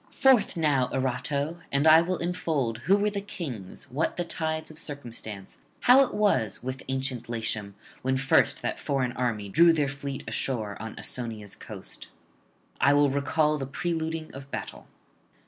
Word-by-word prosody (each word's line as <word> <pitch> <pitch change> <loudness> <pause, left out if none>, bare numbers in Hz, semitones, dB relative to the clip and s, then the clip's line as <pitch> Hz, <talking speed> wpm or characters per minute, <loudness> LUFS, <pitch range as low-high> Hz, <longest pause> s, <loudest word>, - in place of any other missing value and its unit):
Forth 260 -9 +4
now, 145 -6 +2
Erato! 140 +5 -1
and 140 +2 +2
I 160 +1 +9
will 180 +2 -1
unfold 160 -10 -1
who 195 +10 +3
were 210 +1 +1
the 200 -1 -3
kings, 135 - -7
what 145 +6 -1
the 175 - 0
tides 160 -2 -3
of 155 - -6
circumstance, 115 -9 -7 0.2
how 260 +2 +7
it - - -3
was 195 - +1
with 130 +1 -4
ancient 130 -3 -2
Latium 110 -3 -3 0.3
when 130 +1 +1
first 135 +1 +3
that - - -2
foreign 135 -3 0
army 120 -5 -2
drew 170 +11 +6
their 150 -3 +2
fleet 140 0 -5
ashore 110 -6 -2
on 110 -1 -6
Ausonia's 110 -5 -4
coast; - - -7 0.7
I 140 +2 +5
will 145 -1 +4
recall 150 +2 +1
the 135 - -3
preluding 160 +1 -3
of 135 0 -9
battle. - - -6
140 Hz, 160 wpm, -27 LUFS, 125-160 Hz, 0.7 s, I